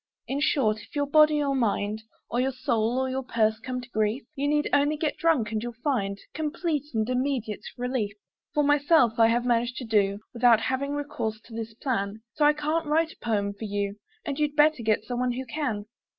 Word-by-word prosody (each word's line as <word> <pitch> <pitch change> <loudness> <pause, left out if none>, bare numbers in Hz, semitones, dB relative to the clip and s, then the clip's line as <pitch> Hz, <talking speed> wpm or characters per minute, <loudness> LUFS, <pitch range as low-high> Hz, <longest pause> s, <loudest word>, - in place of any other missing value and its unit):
In 275 +2 -2
short, 220 -8 +2
if - - -16
your 290 0 +1
body 300 +1 +5
or 280 -1 0
mind 215 -4 0 0.3
Or 240 - 0
your 265 +1 +1
soul 240 -2 0
or 260 0 +1
your 260 +1 -2
purse 220 -3 +1
come 250 +2 -4
to 245 - -12
grief, 215 +4 0
You 280 0 -1
need 295 0 +2
only 290 +1 +3
get 310 0 -1
drunk, 295 -10 +1
and 215 -1 -1
you'll 240 +1 -5
find 200 -9 0 0.2
Complete 310 -1 -2
and 220 0 +1
immediate 250 -4 -1 0.2
relief. 245 -4 -1 0.4
For 295 - +3
myself, 290 -5 +4
I 225 - +7
have 240 +1 +1
managed 240 0 +1
to 255 - -5
do 200 -3 +2 0.2
Without 235 -2 +5
having 265 +4 -1
recourse 225 -7 -3
to 230 - -15
this 225 -1 -5
plan, 215 -4 -2
So 295 - +2
I 295 - +6
can't 305 +2 -1
write 320 +2 +2
a - - -16
poem 205 -3 -1
for 200 +2 -7
you, 205 0 -2 0.3
And 285 -3 -3
you'd 295 -1 0
better 300 -3 +4
get 215 -1 +1
someone 245 +1 -1
who 260 +2 -4
can. 230 -6 -3
250 Hz, 210 wpm, -27 LUFS, 220-290 Hz, 0.4 s, I